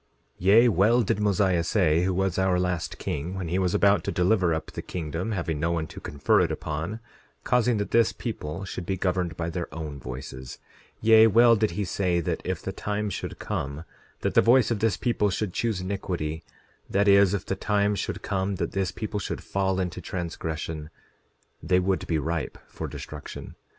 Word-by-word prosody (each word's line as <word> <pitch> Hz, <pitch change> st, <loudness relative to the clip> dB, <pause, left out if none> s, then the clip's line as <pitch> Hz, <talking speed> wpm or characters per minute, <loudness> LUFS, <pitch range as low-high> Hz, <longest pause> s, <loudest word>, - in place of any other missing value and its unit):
10:19 -, -, -43 dB, 0.4 s
Yea, 115 Hz, +5 st, +7 dB
well 115 Hz, +5 st, +4 dB
did 100 Hz, -, 0 dB
Mosiah 100 Hz, -4 st, +2 dB
say, 85 Hz, -4 st, +2 dB
who 95 Hz, -, +1 dB
was 95 Hz, -1 st, 0 dB
our 95 Hz, -1 st, +2 dB
last 90 Hz, -5 st, -2 dB
king, 80 Hz, +6 st, -4 dB
when 90 Hz, -4 st, -4 dB
he 90 Hz, +3 st, 0 dB
was 90 Hz, -2 st, +1 dB
about 100 Hz, -3 st, +4 dB
to -, -, -2 dB
deliver 90 Hz, -1 st, +2 dB
up 80 Hz, 0 st, -3 dB
the -, -, -5 dB
kingdom, 85 Hz, +4 st, -4 dB
having 85 Hz, -6 st, -2 dB
no 85 Hz, +3 st, 0 dB
one 80 Hz, -2 st, -1 dB
to -, -, -10 dB
confer 70 Hz, -2 st, +1 dB
it -, -, +1 dB
upon, 80 Hz, +8 st, -4 dB, 0.4 s
causing 125 Hz, -2 st, +2 dB
that 100 Hz, -, -3 dB
this 115 Hz, -1 st, +4 dB
people 95 Hz, -6 st, -5 dB
should 90 Hz, -2 st, -6 dB
be 95 Hz, -, -1 dB
governed 90 Hz, -2 st, -1 dB
by 85 Hz, -, -2 dB
their 85 Hz, 0 st, -4 dB
own 75 Hz, -3 st, -6 dB
voices—yea, 65 Hz, -, +1 dB
well 115 Hz, +2 st, +6 dB
did 110 Hz, -1 st, +1 dB
he 105 Hz, -, 0 dB
say 90 Hz, 0 st, 0 dB
that 85 Hz, -, -2 dB
if -, -, -3 dB
the -, -, -3 dB
time 105 Hz, 0 st, -3 dB
should -, -, -5 dB
come 70 Hz, +3 st, -4 dB, 0.4 s
that -, -, 0 dB
the -, -, +6 dB
voice 120 Hz, 0 st, +4 dB
of 115 Hz, -, 0 dB
this 110 Hz, -3 st, +1 dB
people 115 Hz, -4 st, +1 dB
should 100 Hz, -1 st, -2 dB
choose 110 Hz, -6 st, -1 dB
iniquity, 90 Hz, -5 st, -3 dB, 0.5 s
that 100 Hz, +1 st, +2 dB
is, 100 Hz, -1 st, +6 dB
if 100 Hz, -, -4 dB
the 95 Hz, -, -2 dB
time 105 Hz, +1 st, +1 dB
should 100 Hz, -, -4 dB
come 95 Hz, +1 st, -1 dB
that -, -, -2 dB
this 95 Hz, -2 st, 0 dB
people 105 Hz, +2 st, -4 dB
should -, -, -4 dB
fall 95 Hz, -1 st, 0 dB
into 90 Hz, -2 st, -3 dB
transgression, 80 Hz, -3 st, -4 dB, 0.7 s
they 90 Hz, -, +2 dB
would 95 Hz, +1 st, 0 dB
be 80 Hz, -, +1 dB
ripe 80 Hz, +2 st, -2 dB
for -, -, -6 dB
destruction. -, -, -8 dB
95 Hz, 195 wpm, -26 LUFS, 85-105 Hz, 0.7 s, Yea